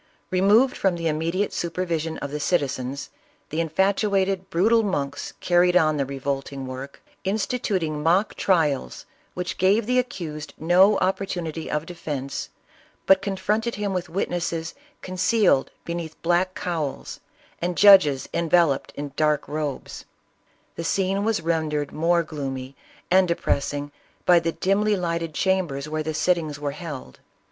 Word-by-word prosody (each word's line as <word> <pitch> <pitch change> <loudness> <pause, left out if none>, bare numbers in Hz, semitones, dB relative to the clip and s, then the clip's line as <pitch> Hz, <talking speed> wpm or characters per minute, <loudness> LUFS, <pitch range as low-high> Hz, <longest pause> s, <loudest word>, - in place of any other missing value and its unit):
Removed 210 +8 +4
from 190 -3 +1
the 165 -1 -2
immediate 165 +6 -1
supervision 165 -2 -2
of 140 - -4
the 150 - -3
citizens, 140 -4 -1 0.4
the 160 +2 0
in 165 - -2
fatuated, 195 +1 +1
brutal 220 +7 +3
monks 145 -9 -3
carried 180 0 +4
on 155 -3 +3
the 140 -2 -1
revolting 135 0 -4
work, 130 +2 -8 0.2
instituting 190 -6 -1
mock 175 +7 +2
trials 150 - 0 0.3
which 180 0 -4
gave 200 +4 +3
the 250 +2 +2
accused 155 -11 -5
no 185 +5 +5
op 190 - +1
portunity 170 -5 -4
of 150 +1 -2
defence, 145 -6 -5 0.6
but 190 0 +5
confronted 210 +4 -1
him 205 -1 -2
with 180 -2 -3
witness 175 -1 -1
es 165 0 -4 0.3
concealed 185 - +2 0.2
beneath 170 -2 -5
black 175 +3 +1
cowls 165 -7 -4 0.4
and 175 0 -2
judges 185 -10 +7
enveloped 165 -4 +2
in 145 -1 -6
dark 150 0 +1
robes; 150 -2 -4 0.7
the 165 - -5
scene 195 +3 0
was 220 -4 +1
rendered 155 -3 -1
more 170 +2 +2
gloomy 135 -4 -5 0.4
and 185 0 +5
depressing 145 -3 -1 0.3
by 175 -1 +6
the 165 0 -1
dimly 205 +2 +1
lighted 170 -3 -2
chambers 175 -7 0
where 155 0 -2
the 155 0 -3
sittings 160 -4 0
were 145 -1 -2
held. 145 - -8
170 Hz, 140 wpm, -24 LUFS, 150-190 Hz, 0.7 s, judges